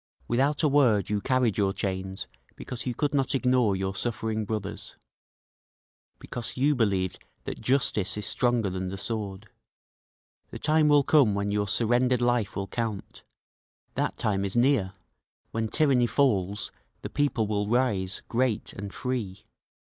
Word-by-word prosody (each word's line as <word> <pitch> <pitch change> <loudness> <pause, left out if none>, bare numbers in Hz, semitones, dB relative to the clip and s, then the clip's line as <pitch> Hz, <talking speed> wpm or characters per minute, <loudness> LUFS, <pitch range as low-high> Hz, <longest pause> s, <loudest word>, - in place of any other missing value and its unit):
Without 140 +6 +1
a - - +5
word 120 -9 +3
you 105 -1 0
carried 125 -4 +1
your 100 -1 +2
chains 95 0 -3 0.3
because 125 0 -6
you 125 - -2
could 145 +3 0
not 135 -1 +2
ignore 125 -6 +3
your 95 0 -2
suffering 110 0 -2
brothers, 105 -1 -5 1.2
Because 120 -1 -6
you 140 +3 +3
believed 100 -7 0 0.2
that - - -6
justice 120 -7 +1
is 105 - -3
stronger 120 -4 +1
than 95 0 -3
the 95 - -5
sword…. 105 -1 -4 1.0
The - - -7
time 155 0 +3
will 145 -1 +5
come 135 -9 +4
when 100 0 -1
your 105 0 0
surrendered 120 +4 +2
life 120 -4 +1
will 100 - -2
count 110 -1 -4 0.7
That - - -1
time 100 -2 0
is 100 -1 -2
near; 120 -6 +3 0.6
when 115 0 -1
tyranny 130 -2 +3
falls 105 -8 +1 0.3
the - - -4
people 140 -6 +1
will 105 -1 -1
rise, 105 -6 0
great 120 -2 0
and 100 0 -6
free! 115 -7 -4
110 Hz, 145 wpm, -27 LUFS, 100-130 Hz, 1.2 s, a